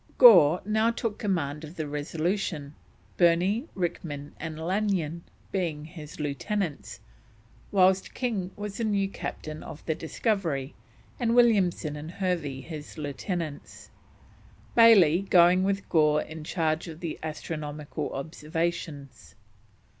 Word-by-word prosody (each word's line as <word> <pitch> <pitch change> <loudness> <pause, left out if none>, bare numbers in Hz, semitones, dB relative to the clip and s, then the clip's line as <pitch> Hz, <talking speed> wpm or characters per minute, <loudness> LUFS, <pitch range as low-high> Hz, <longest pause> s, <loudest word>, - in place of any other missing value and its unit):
Gore 175 - +8
now 220 +2 +2
took 230 -2 -3
command 160 -7 -1
of 155 +2 -9
the 155 -3 -3
Resolution, 155 +1 -2 0.4
Burney, 180 - +3
Rickman, 155 -5 -4
and 160 -1 -5
Lanyon 175 -2 -1 0.3
being 165 -6 -2
his 155 -2 -10
lieutenants, 145 - -3 0.7
whilst 190 -1 +3
King 220 -8 -2
was 205 -1 -6
the - - 0
new 200 -3 +1
Captain 155 -5 -6
of 150 - -10
the 160 - +1
Discovery, 160 - -2 0.5
and 235 -1 +1
Williamson 195 -10 +3
and 150 +2 -7
Hervey 170 -9 -2
his 155 +1 -9
lieutenants; 150 +1 -5 0.8
Bayley 195 -8 +7
going 180 +1 +6
with 200 +1 -1
Gore 150 -2 +3
in 155 0 -9
charge 160 0 -1
of 160 -1 -8
the 170 -3 -4
astronomical 150 -1 -5
observations. 155 -1 -4
165 Hz, 115 wpm, -27 LUFS, 150-195 Hz, 0.8 s, Gore